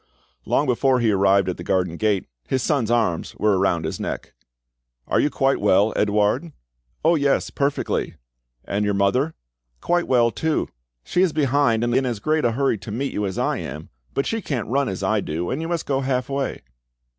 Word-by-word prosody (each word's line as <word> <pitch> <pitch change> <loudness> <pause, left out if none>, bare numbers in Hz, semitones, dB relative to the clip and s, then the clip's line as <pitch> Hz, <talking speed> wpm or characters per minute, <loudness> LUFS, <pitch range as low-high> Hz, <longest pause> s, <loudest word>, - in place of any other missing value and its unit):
Long 145 - +2
before 130 0 +2
he 115 -2 +2
arrived 100 -1 +3
at 90 - -2
the 85 - -7
garden 90 -2 0
gate, 105 0 0 0.2
his 130 -2 0
son's 135 -8 +1
arms 115 -8 0
were 105 -3 +2
around 85 -4 +1
his 80 - -4
neck. - - -5 0.7
"Are - - +2
you 145 - +3
quite 135 -2 +1
well, 105 +1 +3
Edouard 105 +10 +1 0.2
?" - - -20
"Oh 165 - +6
yes, 145 -4 +1
perfectly." 140 0 -1 0.5
"And 100 +1 -1
your 105 -1 +1
mother?" 125 +11 +1 0.4
"Quite 175 - 0
well 120 -2 +3
too. 160 +4 -1 0.3
She 180 - 0
is 185 -5 +3
behind, 140 -6 +2
in 120 +3 +2
as 120 -3 -2
great 155 +8 0
a 115 - +2
hurry 135 -3 +1
to 105 - -8
meet 135 +6 -2
you 105 -1 -1
as 95 - -5
I - - 0
am. - - -7 0.3
But 135 - +1
she 225 0 -2
can't 130 - -3
run 140 +2 +1
as 95 - -4
I 110 -1 +1
do, 85 +1 -3
and 135 - -2
you 165 - -3
must 170 -1 -2
go 135 -1 0
half 130 -1 -1
way." 140 -1 -3
120 Hz, 200 wpm, -22 LUFS, 100-140 Hz, 0.7 s, Oh